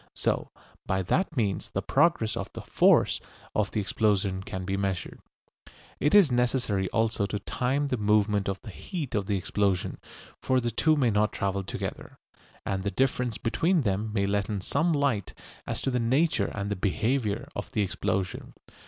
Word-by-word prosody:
So - - 0 0.4
by 95 0 0
that 165 - 0
means 100 -5 0
the - - -1
progress 115 -11 +2
of - - -4
the - - -6
"force" - - +4 0.3
of 105 -1 +1
the 110 - -2
explosion 100 -2 +1
can 95 -1 -5
be 95 +1 -1
measured. 95 -4 -3 0.8
It 145 +7 +3
is 190 -9 +7
necessary 120 -6 +1
also 110 -2 +1
to 105 - -2
time 135 +7 -1
the 125 - 0
movement 105 -1 +2
of 95 - -3
the 110 - -8
"heat" 160 - -5
of 100 -2 -1
the 100 - +1
explosion, 95 -1 0 0.4
for 130 -1 +2
the 120 -1 -1
two 155 +8 +3
may 130 -6 +2
not 105 +1 +2
travel 100 -1 -1
together, 95 - -6 0.5
and 95 -1 -1
the 100 - -1
difference 125 -1 0
between 165 - +1
them 105 -1 -1
may 100 -2 +1
let 100 0 0
in 105 -3 -2
some 160 - +1
light 140 - 0 0.3
as - - -3
to 135 - 0
the 125 - +1
nature 135 +8 +2
and 100 -2 -3
behaviour 110 +2 0
of - - -5
the 105 - +2
explosion. 95 -1 -2
105 Hz, 175 wpm, -28 LUFS, 100-130 Hz, 0.8 s, is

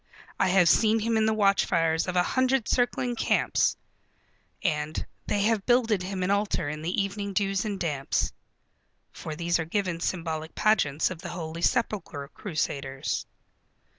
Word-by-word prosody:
"I - - +3
have 185 -1 +4
seen 220 +5 +4
him 230 +1 0
in 220 0 +3
the - - +3
watchfires 170 -6 +2
of 180 - -2
a 180 - +4
hundred 260 +2 +1
circling 245 0 +1
camps" 225 - +1 0.9
and 150 0 -1 0.2
"They 205 -1 +1
have 215 -2 +1
builded 230 -5 +3
him 185 0 -3
an 185 - +1
altar 200 -5 0
in 150 +1 -4
the 175 +6 -1
evening 200 0 -2
dews 195 +1 0
and 205 -2 -3
damps" 150 -6 -1 0.8
for 155 - -7
these 170 +1 0
are 160 - -1
given 180 -1 -1
symbolic 165 -3 -3
pageants 175 -8 +2
of 175 - -6
the 180 - -6
Holy 165 -1 -5
Sepulchre 175 - -1
crusaders. 140 -7 -3
185 Hz, 155 wpm, -27 LUFS, 160-210 Hz, 0.9 s, have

